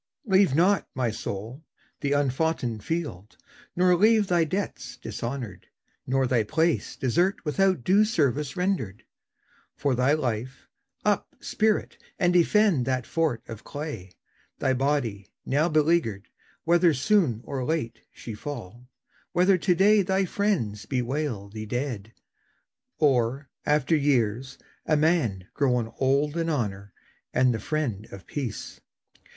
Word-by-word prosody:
Leave 190 - +4
not, 185 +5 +3
my 125 -3 0
soul, 110 +7 -6 0.4
the 140 - -1
unfoughten 140 -4 0
field, 110 - -4 0.4
nor 180 0 +4
leave 215 +3 +4
Thy 175 -3 +2
debts 190 +6 -4
dishonoured, 120 -6 -6 0.4
nor 135 +1 +2
thy 125 -2 +2
place 155 0 0
desert 175 - +1
Without 185 -1 +1
due 200 - +5
service 150 - 0
rendered. 180 - -1 0.7
For 140 -2 0
thy 125 +3 +3
life, 130 -3 -3 0.4
Up, - - 0
spirit, 215 -1 0 0.2
and 175 -1 +2
defend 180 - +3
that 130 -2 0
fort 155 -9 -1
of 115 +1 -8
clay, 145 - -7 0.4
Thy 135 - +1
body, 125 -8 -1 0.2
now 150 +5 +2
beleaguered; 155 - +1 0.3
whether 170 -1 +4
soon 145 - +2
Or 135 -2 -4
late 125 -6 -2
she 115 - -8
fall; 120 -1 -8 0.4
whether 180 +2 +4
to 180 +1 +2
day 205 +3 +5
thy 190 +1 +1
friends 165 - -1
Bewail 125 -4 -2
thee 110 +1 -7
dead, 120 -3 -3 0.9
or, 135 -2 +1 0.2
after 150 +1 +3
years, 130 -3 0 0.3
a 155 - +2
man 145 - +1
Grown 125 -5 0
old 140 +4 +1
in 165 0 0
honour 100 -9 -2 0.4
and 125 0 +4
the 110 - -3
friend 115 -5 -2
of 95 -3 -10
peace. 135 -7 -5
140 Hz, 130 wpm, -26 LUFS, 115-165 Hz, 0.9 s, due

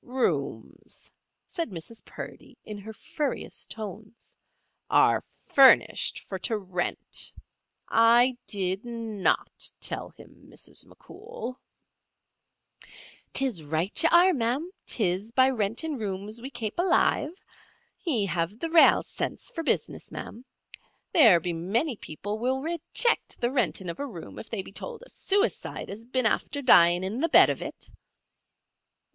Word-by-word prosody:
"Rooms," 155 - -3 0.3
said 335 -7 -4
Mrs. 190 +5 -7
Purdy, - - -10
in 210 -1 -8
her 215 +2 -9
furriest 300 +3 -4
tones, 215 +1 -7 0.5
"are - - +4 0.2
furnished 270 -2 +5
for 190 - -5
to 220 +4 -1
rent. 185 -3 -3 0.6
I 235 +3 +5
did 190 0 -1
not 230 -5 -2
tell - - -4
him, - - -17
Mrs. - - -6
McCool." 445 - -9 1.7
"'Tis 260 -10 0
right 160 +6 -1
ye 330 - +5
are, 360 +2 +6
ma'am; 265 +6 -1 0.2
'tis 200 0 0
by 260 +1 +5
renting 245 +6 -2
rooms 205 +2 -4
we 260 - -6
kape 235 0 -5
alive. 350 -1 +1 0.6
Ye 255 - +1
have 170 +2 -2
the 325 +6 -4
rale 330 -1 +6
sense - - -4
for 330 - -4
business, 325 - -1
ma'am. 235 - -8 0.7
There 225 - +7
be 175 +1 -2
many 225 - 0
people 205 +4 -6
will 260 +3 0
rayjict 340 +8 0
the 240 +1 -1
rentin' 220 -7 0
of 170 - -5
a 285 - -3
room 175 -10 -9
if - - -10
they 210 -5 -3
be - - -12
tould 480 - -6
a - - -14
suicide 405 +3 -1
has 205 +3 -7
been 255 0 -1
after 285 +5 0
dyin' 175 -7 +6
in 210 +7 -3
the 330 - +1
bed - - +7
of - - -5
it." - - -8
230 Hz, 135 wpm, -27 LUFS, 195-280 Hz, 1.7 s, There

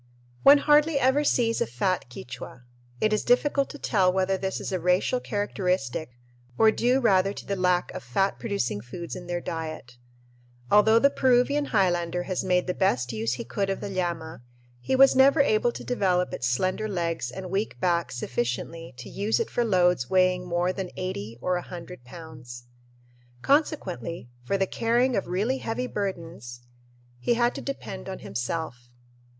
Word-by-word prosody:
One 280 +1 +8
hardly 295 +1 +4
ever 265 +3 +3
sees 235 -5 +1
a - - +1
fat 125 - -1
Quichua. 125 0 -9 0.4
It 215 0 +2
is 215 - 0
difficult 275 +3 +2
to - - -8
tell 190 -9 +2
whether 190 +1 +1
this 190 0 -3
is - - -5
a 185 - -1
racial 180 +8 +1
characteristic 180 - -2 0.4
or 220 -1 +6
due 250 +4 +2
rather 195 -5 +3
to - - -9
the 200 - -2
lack 180 -1 +1
of - - -6
fat 195 +11 0
producing 200 - -2
foods 170 - -7
in 180 -1 -8
their 175 0 -2
diet. 155 -8 -6 0.7
Although 220 +2 +6
the 280 +4 +4
Peruvian 260 +3 +2
highlander 175 -6 +1
has 185 0 -2
made 180 -1 +1
the 180 - -1
best 125 - 0
use 110 +2 -1
he 125 - -4
could 195 - -2
of 195 - -2
the 205 - -5
llama, 170 -5 -3 0.4
he 260 - -1
was 270 0 +6
never 275 +3 +5
able 240 -3 +3
to - - -8
develop 185 -7 0
its 125 - -2
slender 185 - 0
legs 170 -8 -2
and 185 +6 -7
weak 200 +3 -2
back 175 -2 0
sufficiently 125 +5 -4
to - - -9
use 205 +3 -1
it 460 - -2
for 240 - +1
loads 180 - +2
weighing 185 -1 +2
more 175 +1 0
than 185 -1 -4
eighty 115 - -5
or 180 +4 0
a - - -3
hundred 175 -5 -10
pounds. 125 -5 -11 0.8
Consequently, 195 - 0 0.2
for 195 - 0
the 195 - +2
carrying 240 +5 +1
of 195 - -1
really 215 +9 -1
heavy 225 +3 -3
burdens 165 - -5 0.6
he 240 - +1
had 240 +1 +2
to - - -6
depend 195 -9 -6
on 190 - -5
himself. 125 -2 -5
185 Hz, 175 wpm, -26 LUFS, 165-225 Hz, 0.8 s, One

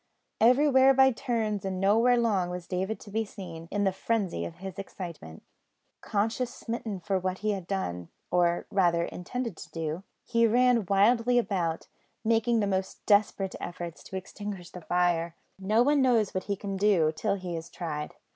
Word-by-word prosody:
Everywhere 265 +2 +5
by 265 0 +6
turns, 225 -5 -2
and 190 -1 -3
nowhere 225 +6 +4
long, 205 -7 +1
was 180 -1 -5
David 190 +5 -2
to 205 - -11
be 220 +2 0
seen, 175 -6 -9
in 205 0 -1
the 195 - +3
frenzy 190 - -1
of 85 - -7
his 190 +1 -8
excitement. 170 - -8 0.6
Conscience 225 +4 -1
smitten, 225 -5 -5
for 190 +1 -1
what 185 0 -2
he 215 - +3
had 190 -4 -4
done, 90 - -3 0.2
or 175 -1 +2
rather 175 -3 +3
intended 230 +5 -5
to - - -10
do, 160 +1 -4 0.2
he 230 -1 +3
ran 240 -2 +3
wildly 230 +5 +4
about, 180 -8 -1 0.4
making 230 0 +2
the - - +2
most 190 -1 -3
desperate 205 -2 +2
efforts 175 -1 -6
to - - -8
extinguish 190 -1 -7
the 180 - -9
fire. 170 -1 +1 0.2
No 215 +5 +3
one 290 +1 +3
knows 235 -6 +3
what 185 - -3
he 200 - -1
can 195 0 -5
do 190 -6 +3
till 155 - 0
he 180 -3 -5
is 165 +1 -6
tried. 150 -4 -5
195 Hz, 175 wpm, -28 LUFS, 175-225 Hz, 0.6 s, by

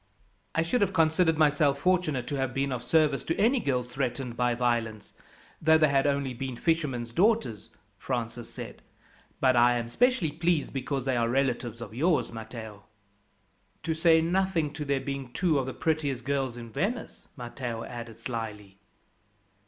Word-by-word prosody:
"I 160 - +3
should 185 +9 0
have 195 -1 +2
considered 160 0 +3
myself 145 -2 +3
fortunate 175 -8 +1
to 145 - -3
have 130 -2 -2
been 135 0 0
of 125 -2 -2
service 145 +3 +2
to 165 - -1
any 240 +5 +3
girls 125 - -1
threatened 125 -1 -3
by 120 0 +1
violence, 115 -3 -1 0.5
though 160 0 +6
they 155 -1 +4
had 140 0 +3
only 140 -2 0
been 130 +1 -5
fishermen's 135 -6 -1
daughters," 175 - +1 0.3
Francis 120 -2 -4
said; - - -8 0.6
"but 130 -1 +4
I 120 0 +5
am 115 0 -4
specially 245 - +2
pleased 165 -1 0
because 135 0 -2
they 130 -2 +1
are 115 -1 +1
relatives 120 -3 -1
of 110 -2 -7
yours, 155 +6 +1
Matteo." 110 -2 -8 1.0
"To 160 - 0
say 160 0 +4
nothing 170 -3 0
to 150 0 -5
their 140 -1 0
being 135 -2 -5
two 170 -6 +2
of 130 - -2
the 130 - -4
prettiest 145 -6 -1
girls 135 -3 -1
in 115 -1 -9
Venice," 225 - -3
Matteo 120 -2 -5
added 115 -2 -8
slyly. 105 -4 -6
135 Hz, 165 wpm, -28 LUFS, 120-160 Hz, 1.0 s, though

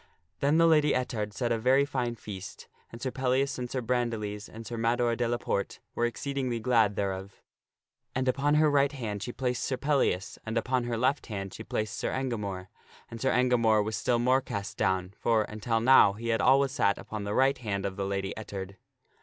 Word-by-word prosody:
Then 145 +3 +3
the 165 - +5
Lady 150 -3 +4
Ettard 110 -5 -2
set 120 +3 -2
a 115 - +1
very 130 +4 +4
fine 125 -4 -2
feast 95 -4 -9 0.2
and 115 - -9
Sir 130 +1 -3
Pellias 130 +1 0
and 125 -1 -4
Sir 130 - -2
Bran 120 0 0
diles 105 -2 -5
and 115 +1 -10
Sir 120 - -5
Mador 115 +1 +1
de 120 0 0
la 120 +1 0
Porte 100 -4 -2
were 120 - +1
exceedingly 130 -1 -3
glad 110 -3 +3
thereof. 95 0 -4 0.7
And 130 0 0
upon 140 +3 +2
her 155 0 +4
right 140 -1 +3
hand 110 -7 -4
she 120 - -4
placed 125 -1 -2
Sir 130 - -1
Pellias, 130 -9 0
and 110 +1 -3
upon 125 +1 0
her 120 -1 -2
left 130 +5 +1
hand 95 -3 -5
she 110 - -8
placed 110 -1 -3
Sir - - -1
Engamore. 105 -8 -3 0.4
And 115 - -8
Sir 135 - +2
Engamore 115 -4 +3
was 110 +1 -3
still 120 - +1
more 130 +3 +3
cast 100 -5 -5
down, 95 0 0
for, 115 -2 +2
until 110 +2 -2
now, 115 -4 +6
he 115 +3 -5
had 115 - +2
always 135 0 +4
sat 100 -7 +2
upon 105 -1 -6
the 100 +1 -3
right 135 +1 +3
hand 100 -5 -3
of 95 -1 -3
the 100 - -2
Lady 95 0 -2
Et 110 - -8
tard. 100 0 -6
115 Hz, 210 wpm, -29 LUFS, 105-130 Hz, 0.7 s, now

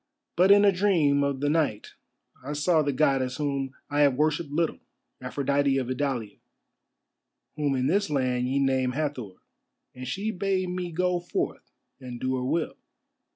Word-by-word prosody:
But 180 +3 +4
in 205 +1 +7
a 200 - +6
dream 170 -8 +2
of 140 -1 -1
the 145 - +1
night 150 -10 -1 0.5
I 145 +3 -4
saw 155 +2 +2
the 145 -1 0
Goddess 130 -2 +1
whom 140 -3 -2
I 145 0 -2
have 140 -3 +4
worshipped 150 +2 0
little, 160 +3 -1 0.4
Aphrodite 140 +1 0
of 130 -1 -2
Idalia, 125 -5 -2 1.2
whom 145 -2 0
in 130 -1 0
this 200 +4 +1
land 125 -3 0
ye 135 +2 0
name 130 -2 +1
Hathor, 130 -9 -3 0.6
and 130 0 -8
she 205 - -2
bade 190 -2 -1
me 180 -1 -4
go 180 +1 0
forth 175 - -4 0.3
and 125 -2 -8
do 130 +1 -1
her 125 - -3
will. 160 +5 -1
145 Hz, 160 wpm, -26 LUFS, 130-170 Hz, 1.2 s, in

